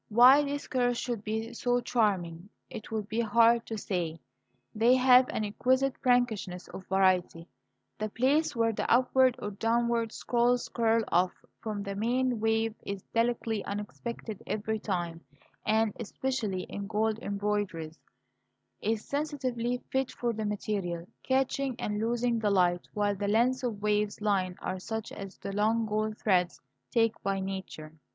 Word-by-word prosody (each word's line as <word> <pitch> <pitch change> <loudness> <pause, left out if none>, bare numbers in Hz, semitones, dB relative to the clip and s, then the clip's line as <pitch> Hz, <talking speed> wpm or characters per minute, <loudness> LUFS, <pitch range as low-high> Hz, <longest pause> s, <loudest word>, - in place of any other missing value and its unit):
Why 250 +6 +8
these 285 0 -4
curves 245 -2 +1
should 235 -4 -3
be 220 +2 -3
so 245 +1 +1
charming 195 -7 0 0.2
it 215 - -8
would 215 -2 -3
be 220 +2 -2
hard 230 +1 +4
to 225 - -4
say; 175 -5 -3 0.5
they 235 +4 +4
have 255 0 +6
an 215 - -2
exquisite 260 +5 +1
prankishness 235 -8 +1
of 190 - -9
variety, 185 -3 +2 0.5
the 215 0 -2
place 270 +8 +1
where 230 -1 +2
the - - -2
upward 255 +1 +4
or 205 - -5
downward 230 +2 0
scrolls 245 0 +1
curl 230 -1 +2
off 180 +1 +3 0.3
from 210 -2 -4
the 200 -1 -4
main 245 +3 0
wave 225 0 +1
is 200 -1 -5
delicately 230 -2 0
unexpected 210 +1 -6
every 220 +1 -2
time, 175 -5 -3 0.5
and 220 -1 +2
especially 230 -4 -2
in 200 0 -6
gold 220 +1 0
embroideries 200 -6 -2 0.8
is 220 +1 -1
sensitively 255 -5 -2
fit 265 -1 0
for 240 -1 -2
the 220 0 -3
material, 195 -5 -3
catching 265 0 0
and 210 0 -2
losing 235 +1 0
the 215 -2 +1
light, 180 -3 +2
while 205 -1 +1
the 200 +1 -3
lengths 240 +5 +2
of 225 -5 -3
waving 210 0 +2
line 195 -4 0
are 185 - -3
such 220 +3 -5
as 195 -2 -8
the 200 - -6
long 220 +3 +2
gold 215 0 -1
threads 180 -4 +1 0.3
take 225 -1 +1
by 195 0 -1
nature. 190 -5 -6
220 Hz, 150 wpm, -29 LUFS, 200-240 Hz, 0.8 s, Why